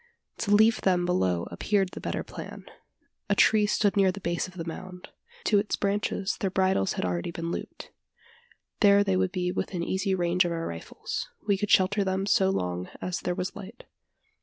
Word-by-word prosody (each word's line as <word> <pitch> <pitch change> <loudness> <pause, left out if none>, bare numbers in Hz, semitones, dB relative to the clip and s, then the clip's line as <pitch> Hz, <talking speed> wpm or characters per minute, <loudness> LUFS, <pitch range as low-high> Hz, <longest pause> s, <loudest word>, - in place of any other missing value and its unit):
To 200 - -2
leave 220 +2 +5
them 180 -2 +2
below 95 - +1
appeared 200 -3 0
the - - -9
better - - -3
plan. - - -9 0.6
A - - +3
tree 215 -1 +4
stood 205 -1 +2
near 195 -2 +4
the 200 - -8
base 170 -2 -2
of 185 - -14
the 165 -2 -5
mound. 180 +2 -8 0.3
To 205 - +4
its 210 - -1
branches 200 -1 -1
their 195 -4 0
bridles 185 - +1
had - - -3
been 90 - 0
already 85 - -3
looped. 165 0 -6 0.9
There 200 -1 +6
they 95 - +1
would 95 0 +1
be 180 -1 -1
within 180 -1 -3
easy 190 +2 0
range 175 0 +2
of 175 - -2
our 165 0 -3
rifles. 85 0 -5 0.2
We 205 -2 +3
could 205 +1 -2
shelter 200 +1 +4
them 190 0 -1
so 190 -1 +3
long 90 - -2
as 185 0 -3
there 180 - -2
was 185 +1 -3
light. 210 +4 -10
185 Hz, 190 wpm, -27 LUFS, 170-200 Hz, 0.9 s, There